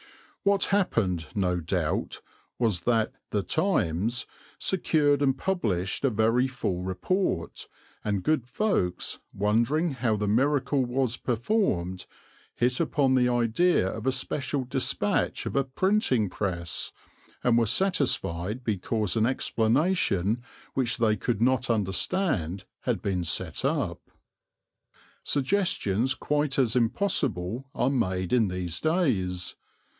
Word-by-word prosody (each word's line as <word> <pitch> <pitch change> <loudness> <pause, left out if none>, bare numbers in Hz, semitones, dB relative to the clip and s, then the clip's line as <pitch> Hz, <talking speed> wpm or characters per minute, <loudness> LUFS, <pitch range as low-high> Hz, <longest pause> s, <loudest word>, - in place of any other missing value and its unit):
What 200 0 +3
happened, 95 - +1
no 90 -3 +1
doubt, 80 - -2 0.4
was 110 -7 +1
that 110 +3 +1 0.2
The 105 -2 -1
Times 120 - 0 0.3
secured 150 -6 +2
and 135 -2 +2
published 105 - -1
a 135 - +4
very 115 +3 +2
full 100 -9 -3
report, 95 - -2 0.4
and 100 -3 -1
good 150 -3 +1
folks, 125 - -1
wondering 120 - +1
how 120 -4 0
the 105 0 -2
miracle 135 +4 +2
was 125 -1 0
performed, 110 - -1 0.5
hit 125 +1 +1
upon 145 -5 +2
the 125 -1 +3
idea 120 - +2
of 110 +5 -4
a - - +4
special 135 +1 -2
dispatch 125 - -1
of - - -4
a 140 - +3
printing 130 - +1
press, 85 -5 -3 0.5
and 120 -2 +4
were 115 -1 +3
satisfied 120 - +1
because 110 -1 -1
an 110 0 +3
explanation 120 - +1 0.3
which 125 -2 +1
they 110 -3 +3
could 110 +2 -2
not 130 0 +2
understand 100 - 0 0.2
had - - -2
been 95 -3 -1
set 85 -1 -1
up. - - -1 1.2
Suggestions 130 - +1
quite 145 -1 -1
as 125 -4 +2
impossible 120 - 0
are 130 - +1
made 95 -8 -1
in 115 -4 +4
these 90 -2 -3
days. 105 - 0
120 Hz, 120 wpm, -27 LUFS, 95-140 Hz, 1.2 s, a